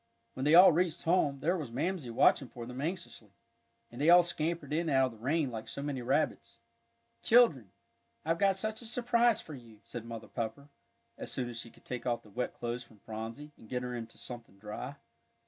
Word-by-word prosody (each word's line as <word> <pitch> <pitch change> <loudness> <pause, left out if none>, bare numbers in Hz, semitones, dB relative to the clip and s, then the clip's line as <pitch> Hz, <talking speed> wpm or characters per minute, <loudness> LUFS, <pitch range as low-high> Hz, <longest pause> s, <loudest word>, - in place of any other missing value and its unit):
When 130 - -3
they 150 +2 +6
all 180 +2 +10
reached 170 0 0
home, 150 -5 +2
there 175 +5 +2
was 150 -8 -4
Mamsie 155 +2 -2
watching 120 +3 +4
for 120 -1 -8
them 125 +2 -6
anxiously. 165 - -5 0.6
And 120 +3 -7
they 155 - +4
all 175 0 +9
scampered 165 -3 -2
in 165 +1 0
out 135 -2 +4
of 110 - -16
the - - -16
rain 145 0 +1
like 110 -1 -6
so 140 - -5
many 140 -3 -3
rabbits. 135 -1 -1 0.6
"Children, 190 - +5 0.6
I've 165 +1 +1
got 195 -1 +4
such 215 +3 -3
a 235 - -9
surprise 240 0 +2
for 155 - -10
you," 115 -5 -12
said 120 -2 -7
Mother 115 -1 -7
Pepper, 115 +5 -5 0.5
as - - -6
soon 125 -2 -2
as 115 -1 -6
she 115 - -7
could - - -22
take 125 -1 -5
off 120 -1 0
the 105 - -17
wet 125 +4 -3
clothes 120 +1 -4
from 115 -2 -20
Phronsie, 115 +8 -7
and 110 - -16
get 125 -1 -2
her 125 0 -4
into 115 -1 -7
something 115 -5 -9
dry. 105 +7 -6
135 Hz, 210 wpm, -32 LUFS, 120-170 Hz, 0.6 s, all